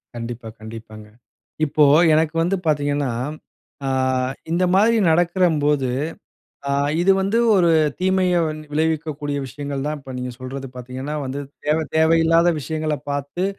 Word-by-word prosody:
கண்டிப்பா. 115 0 -6
கண்டிப்பாங்க. 110 -1 -10 0.6
இப்போ, 150 +1 +2 0.3
எனக்கு 160 +1 +2
வந்து 190 +3 +1
பார்த்தீங்கன்னா, 145 -3 0 0.8
ஆ - - 0 0.6
இந்த 175 +2 +1
மாதிரி 220 +4 +4 0.2
நடக்கும்போது, 160 -6 +2 0.8
அ - - 0 0.3
இது 185 +3 +3
வந்து 200 +4 +1 0.2
ஒரு 175 -2 +4 0.3
தீமைய 185 -1 +2 0.4
விளைவிக்கக்கூடிய 150 -2 -1
விஷயங்கள் 140 +1 -5
தான். 150 0 -2
இப்ப 135 -1 -10
நீங்க 125 0 -4
சொல்றது 135 +1 -6
பார்த்தீங்கன்னா, 130 +4 -6
வந்து 135 +2 -4 0.3
தேவை 155 +2 +2
தேவையில்லாத 165 +1 +4
விஷயங்கள 155 0 -2
பார்த்து, 145 +5 -3
150 Hz, 120 wpm, -21 LUFS, 135-165 Hz, 0.8 s, மாதிரி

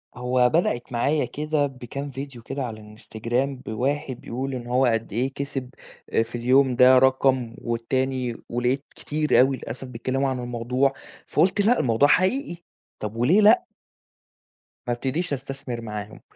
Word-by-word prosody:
هو 125 0 +2
بدأِت 155 -8 0
معايا 140 +4 +1
كده 150 +3 -1
بكام 135 +2 -7
فيديو 135 -2 -7
كده 135 +3 -4
على 115 -3 -5 0.2
الInstagram 120 +4 -2 0.2
بواحد 130 +3 -2
بيقول 130 +3 -4
إن 120 -1 -6
هو 125 +2 +3
قد 115 -3 0
إيه 130 +5 -1
كسب 135 -2 -4 0.5
في 120 +1 -9
اليوم 130 +2 +3
ده 130 +1 +7
رقم، 130 -2 +2
والتاني 125 +1 -1
ولقيت 125 +3 0
كتير 150 0 +1
أوي 130 +1 +4
للأسف 125 +3 -7
بيتكلموا 130 +3 -1
عن 130 -1 -2
الموضوع 125 +3 0 0.3
فقُلت 190 +3 +2
لأ، 230 +5 +3
الموضوع 120 +3 +3
حقيقي 185 - +2 0.4
طَب 105 +1 -5
وليه 145 - +4
لأ؟ 215 +3 +6 1.2
ما 120 - +1
أبتديش 140 +7 -2
أستثمر 135 -2 -5
معاهم، 105 -1 -7
130 Hz, 145 wpm, -24 LUFS, 120-140 Hz, 1.2 s, ده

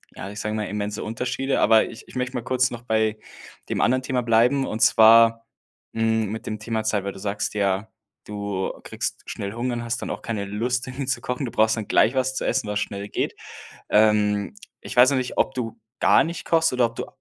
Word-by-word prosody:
ja, 95 - -7
ich 105 +1 -8
sage 105 0 -3
mal, 105 -1 -2
immense 105 0 -4
Unterschiede. 125 +4 -2
Aber 110 -1 +5
ich 115 - -10
ich - - -15
möchte 125 0 -2
mal 120 - -3
kurz 130 0 +1
noch 120 -1 -7
bei 110 -2 0 0.5
dem - - -1
anderen 130 +1 +2
Thema 130 -1 -1
bleiben. 120 +4 +3
Und 110 - -4
zwar, 115 +1 +6 0.5
hm, 110 -2 +1
mit 110 - -6
dem 110 -1 -4
Thema 110 0 -2
Zeit. 105 -3 -1
Weil 100 - -3
du 95 - -11
sagst 105 +1 -3
ja, 100 0 0 0.4
du 100 -2 -3
kriegst - - -4
schnell 100 +1 -5
Hunger 120 +1 -2
und 120 - -4
hast 115 - -3
dann - - -5
auch - - -5
keine 110 -3 -3
Lust 120 +5 -2
dann 130 +1 -5
zu 130 -2 -1
kochen. 125 +2 -3
Du 115 - -5
brauchst 110 0 +3
dann 110 - -4
gleich 120 +5 +3
was 130 0 0
zu - - -2
essen, 105 - 0
was 105 0 -1
schnell 100 +1 -4
geht. - - -2 0.6
Ähm, 105 - +3 0.3
ich - - -8
weiß 125 +3 +7
noch 140 - +1
nicht 125 - -4
ob 135 - +2
du 115 -2 -4 0.2
gar - - +5
nicht 170 +1 -5
kochst 165 -2 +2
oder 125 -2 +3
ob 115 - -9
du - - -4
115 Hz, 225 wpm, -23 LUFS, 105-125 Hz, 0.6 s, weiß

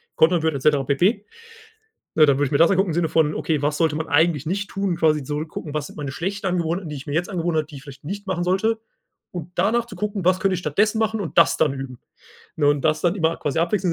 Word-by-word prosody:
kontern 165 0 +3
wird 160 -2 +1
et 135 - -4
cetera 145 -1 +3
pp. 185 - +1 0.9
Ja, 155 -1 +7
dann 140 -2 +3
würde 145 - +2
ich 135 - -5
mir 140 - +3
das 165 - +5
angucken 195 -1 +2
im - - -2
Sinne 170 -1 +1
von: 155 -1 +2
„Okay, 150 -3 -1
was 150 +1 0
sollte 160 -3 +2
man 160 0 -4
eigentlich 160 -1 +2
nicht 200 +4 -2
tun?“ 195 -3 -1
Quasi 155 -4 +2
so 150 +2 -3
gucken, 155 -1 -7
was 150 - -2
sind - - -14
meine 145 -2 -4
schlechten 195 +6 -4
Angewohnheiten, 175 0 -1
die 150 - -5
ich 140 - -9
mir 145 - -4
jetzt 175 +5 -1
angewöhnt 170 -3 -1
habe, 155 -1 0
die 150 - -11
ich 135 - -10
vielleicht 140 -1 -12
nicht 200 +6 -6
machen 185 -2 -1
sollte, 195 +5 +1 0.5
und 175 -1 -7
danach 220 +6 +2
zu 230 - -10
gucken: 205 -3 -3
„Was 185 +1 +3
könnte 195 -1 +1
ich - - -2
stattdessen 205 +8 +1
machen?“ 220 0 0
und 180 - -3
das - - +5
dann 150 -3 +2
üben, 135 -2 -7 0.6
ne, 150 - +2
und 145 -1 +2
das 155 0 +1
dann 175 0 +2
immer 165 -2 +1
quasi 150 +2 -2
abwechseln 175 +1 +1
165 Hz, 265 wpm, -22 LUFS, 150-190 Hz, 0.9 s, Ja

